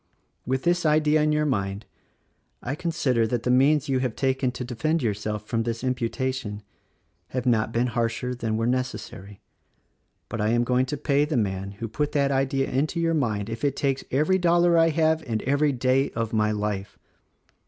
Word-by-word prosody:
With 130 +1 -1
this 175 0 +2
idea 155 0 +3
in 150 0 +2
your 150 0 +1
mind, 100 -6 -2 0.8
I 130 - -2
consider 140 -8 0
that 120 0 -2
the 125 - +1
means 140 +4 +4
you 135 -2 +1
have 130 -3 -2
taken 130 -1 0
to 125 - -5
defend 135 +6 -1
yourself 105 -1 -2
from 115 +1 -1
this 115 +1 -3
imputation, 125 -3 -2 0.6
have 125 +4 -4
not 115 -3 +2
been 120 +2 +1
harsher 120 +1 -1
than 115 -3 -2
were 115 - 0
necessary; 110 -5 -4 0.9
but 115 - -4
I 105 - +1
am 120 +1 +2
going 125 +1 +1
to 145 - -3
pay 145 0 +2
the 150 -3 -1
man 100 -2 -2
who 115 +3 -5
put 145 +7 -2
that 140 -1 +2
idea 135 0 +1
into 150 +6 0
your 165 0 +1
mind 110 -9 -1
if 115 +2 -6
it 140 -2 +1
takes 135 -2 -1
every 155 +8 +2
dollar 175 0 +4
I 165 0 +5
have 160 0 +2
and 110 -2 -2
every 145 +2 +2
day 130 +2 +1
of 115 0 -2
my 105 -1 +2
life. 105 -1 -3
130 Hz, 185 wpm, -25 LUFS, 115-145 Hz, 0.9 s, I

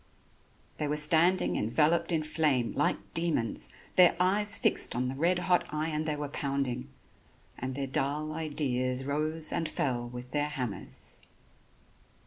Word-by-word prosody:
They 150 - 0
were 150 +1 0
standing 165 +5 +3
enveloped 160 +10 +2
in 160 -2 +1
flame, 150 -6 +1
like 145 - +1 0.2
demons, 165 -9 0 0.3
their 180 -2 +7
eyes 205 +4 +3
fixed - - +2
on 125 +1 0
the - - -3
red 170 +6 +2
hot 180 0 +2
iron 155 0 -2
they 155 -1 -1
were 145 0 -4
pounding; 135 -2 -3 0.7
and 130 +1 -5
their 140 0 -2
dull 145 +3 -1
ideas 135 -5 -1
rose 155 +3 0
and 160 -2 -1
fell 120 -5 -2
with 125 +1 -9
their 145 +1 0
hammers. 125 -8 -5
150 Hz, 140 wpm, -30 LUFS, 130-160 Hz, 0.7 s, their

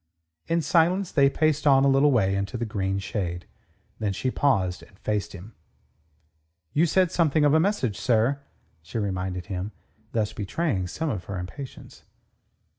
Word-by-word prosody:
In 165 0 +1
silence 175 +5 +2
they 140 -2 +4
paced 155 0 +1
on 135 -1 +6
a - - +5
little 140 +2 +4
way 100 -7 +2
into 100 +4 -2
the 120 - -2
green 95 -2 -2
shade. 95 -3 -3 0.5
Then 105 -2 -1
she 130 +6 -1
paused 95 -12 +1
and 100 - -18
faced 105 -1 -2
him. 100 +4 -10 1.2
"You 165 +4 +3
said 185 +2 +2
something 155 -4 +2
of 145 - +4
a 160 - +5
message, 160 - 0
sir," 125 +4 +2 0.4
she 80 +8 -7
reminded 95 -3 -2
him, 95 +1 -4 0.4
thus 110 -2 -1
betraying 105 - -1
some 155 - -2
of 95 -6 -5
her 100 - -5
impatience. 95 +10 -8
115 Hz, 160 wpm, -26 LUFS, 95-150 Hz, 1.2 s, on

